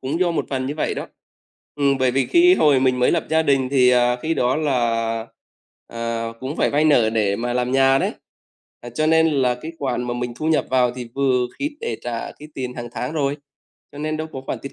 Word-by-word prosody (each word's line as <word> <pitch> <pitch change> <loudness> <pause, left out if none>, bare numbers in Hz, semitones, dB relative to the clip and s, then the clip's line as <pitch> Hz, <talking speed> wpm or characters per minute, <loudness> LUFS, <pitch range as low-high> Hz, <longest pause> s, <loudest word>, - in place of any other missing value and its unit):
cũng 145 +7 -3
do 180 - +3
một 165 - -2
phần 130 -1 -2
như 140 - -3
vậy 155 - -1
đó. - - -5 0.7
Ừm, 140 -2 +2
bởi 130 -1 +2
vì 130 +1 0
khi 355 +1 +5
hồi 145 - +4
mình 130 -1 +2
mới 125 - +3
lập 170 - 0
gia 160 0 +3
đình 135 -3 +2
thì, 125 -2 +4
à, 125 0 +3
khi 160 +1 0
đó 125 +3 +1
là, 135 -6 +1 1.0
à, 115 0 -4
cũng 135 +5 -5
phải - - +1
vay 150 +2 +2
nợ 125 -8 +4
để 105 -3 +1
mà 120 +2 -2
làm 125 +1 -1
nhà 135 0 +4
đấy, - - -1 0.7
ờ, 120 - -9
cho 155 +6 -1
nên 160 0 +4
là 130 -5 +1
cái 155 +7 -8
khoản 130 -3 -2
mà 120 0 -3
mình 120 0 -3
thu 155 - -4
nhập 160 -1 +2
vào 125 -2 +3
thì 125 -2 -7
vừa 130 -2 +1
khít 290 +1 -3
để 115 - -3
trả 120 -1 -4
cái 150 +1 -11
tiền 125 -1 -5
hàng 120 -1 -6
tháng 125 +5 -3
rồi. 145 -2 -1 0.6
Cho 145 - -11
nên 155 +1 -2
đâu 155 +1 -4
có 135 - -6
khoản - - -3
tiết 140 - -7
130 Hz, 240 wpm, -21 LUFS, 125-150 Hz, 1.0 s, khi